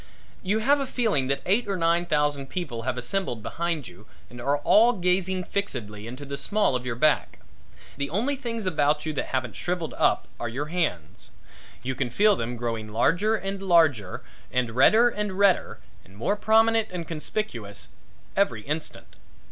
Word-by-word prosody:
You 200 +3 0
have 285 +2 +4
a 275 - -2
feeling 220 - +1
that 140 +1 -1
eight 210 +5 +2
or 195 -1 -1
nine 170 +1 +2
thousand 145 -3 +1
people 145 -11 -4
have 130 +1 -2
assembled 125 - -2
behind 165 -2 -2
you 90 +4 -15 0.2
and 120 0 -9
are 140 +4 +1
all 225 +11 +5
gazing 185 -1 +1
fixedly 110 - -4
into 130 +4 -8
the 140 0 -5
small 205 -2 +1
of 125 0 -3
your 120 - -2
back. 150 +5 +2 0.6
The 140 0 -2
only 240 - 0
things 230 -5 -4
about 150 -3 +1
you 155 - -2
that 145 - -2
haven't 130 -3 -2
shrivelled 175 -2 -3
up - - +2
are 120 - -3
your 135 +6 -3
hands. 90 - -2 0.5
You 130 +1 -2
can 130 -1 -2
feel 205 - +4
them 120 -5 -4
growing 115 -2 -3
larger 175 - +2
and 195 -2 -4
larger 160 - +2 0.3
and 125 -2 0
redder 215 - +6
and 210 -4 -2
redder 200 -2 +2 0.2
and 95 +2 -18
more 195 - 0
prominent 225 +1 +3
and 175 -2 -5
conspicuous 150 - -4 0.5
every 125 - +1
instant. 155 +2 -5
160 Hz, 170 wpm, -26 LUFS, 125-200 Hz, 0.6 s, redder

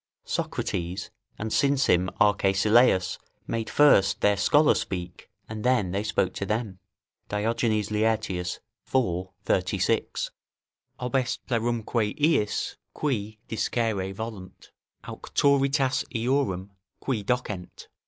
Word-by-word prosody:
Socrates, 90 +2 -3 0.3
and 110 0 -3
since 140 -1 +3
him 90 +1 +3
Arcesilaus, 100 0 +3 0.3
made 115 -1 -3
first 145 -10 +5
their 105 0 +4
scholars 145 +9 +4
speak, 90 -2 -6 0.2
and 110 -1 -6
then 120 -8 +2
they 100 +2 -1
spoke 100 -3 0
to - - -4
them 105 -3 -2 0.5
[Diogenes 110 0 0
Laertius, 105 -5 -1 0.3
iv. 95 -8 +1 0.2
36.] 95 +4 0 0.7
"Obest 125 0 -1
plerumque 115 -2 -1
iis, 145 -9 +1 0.2
qui 110 -7 -2
discere 110 -4 -1
volunt, 95 -3 -8 0.3
auctoritas 140 -1 +1
eorum, 115 -6 0 0.3
qui 125 -6 -2
docent." 105 -5 -3
110 Hz, 100 wpm, -26 LUFS, 95-125 Hz, 0.7 s, first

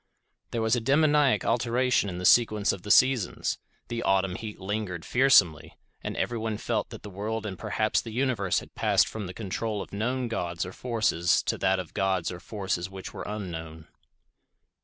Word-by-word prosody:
There 115 -1 -2
was 110 +2 +3
a 120 - -1
daemoniac 145 +2 +3
alteration 120 -1 +1
in 90 - -5
the 90 - -4
sequence 110 -3 +4
of 100 - -6
the 105 - -9
seasons—the 120 0 +1
autumn 95 -2 +1
heat 105 +3 -7
lingered 95 -3 -4
fearsomely, 110 - +3 0.3
and - - -4
everyone 110 -2 -2
felt - - -2
that - - -10
the 105 - -7
world 110 +3 -4
and 100 -3 -4
perhaps 110 +4 0
the 115 - -8
universe 115 -5 0
had - - -15
passed - - +3
from 105 -3 -5
the 90 - -7
control 105 +1 -3
of - - -8
known 125 +5 -1
gods 90 -7 -3
or 90 - -8
forces 110 -8 +1
to - - 0
that 95 0 +2
of 90 -3 -6
gods 95 -3 0
or 90 - -7
forces 95 -3 -3
which 95 -1 -8
were - - -7
unknown. 80 -6 -6
105 Hz, 180 wpm, -27 LUFS, 95-115 Hz, 0.3 s, sequence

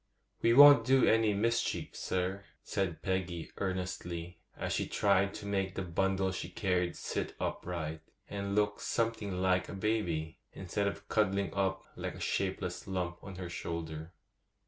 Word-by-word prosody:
'We 115 - +4
won't 145 -3 +10
do 130 +2 +5
any 110 -2 +4
mischief, 115 +3 0
sir,' 95 +2 -2 0.2
said 90 -5 -2
Peggy 95 -3 -2
earnestly, 90 -2 -3 0.2
as - - -2
she - - 0
tried 100 -1 +2
to - - -7
make 95 -1 -1
the 95 - -2
bundle 95 +2 +1
she 90 -1 -4
carried 90 -1 0
sit - - -3
upright, 80 -3 -3 0.3
and 100 0 -3
look 105 0 +2
something 115 -3 -1
like 90 0 +2
a - - -6
baby, 90 -7 -1
instead 100 +2 -2
of 100 0 -5
cuddling 100 -2 +1
up 95 -1 0
like - - -4
a - - -10
shapeless 95 -1 -2
lump 90 -2 -3
on 100 -1 -8
her 90 -1 -5
shoulder. 80 -1 -5
95 Hz, 150 wpm, -32 LUFS, 90-100 Hz, 0.3 s, won't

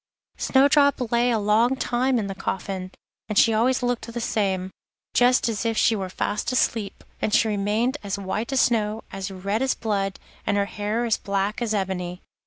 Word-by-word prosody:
Snowdrop 280 -2 +3
lay 240 +1 +3
a 235 - +2
long 220 +5 +3
time 255 0 0
in 215 - -1
the 195 - -4
coffin, 190 -1 -4 0.4
and 210 - -2
she 225 - +6
always 250 +4 +2
looked 245 -1 -2
the 240 - -4
same, 190 -5 -1 0.4
just 250 +1 +4
as 225 -1 -2
if 225 -1 -1
she 225 - +4
were 190 -3 -3
fast 205 +5 -2
asleep, 225 -5 -1 0.2
and - - 0
she 225 - +4
remained 215 +6 0
as 200 -1 -3
white 205 +5 -3
as 270 - +3
snow, 220 -2 +1
as 195 0 -5
red 200 +4 -2
as 265 -1 +1
blood, 200 -3 -2 0.2
and 205 - 0
her 200 - +2
hair 210 +4 -2
as 230 - +1
black 200 +3 -2
as 220 -2 0
ebony. 180 -2 -3
215 Hz, 190 wpm, -24 LUFS, 200-240 Hz, 0.4 s, she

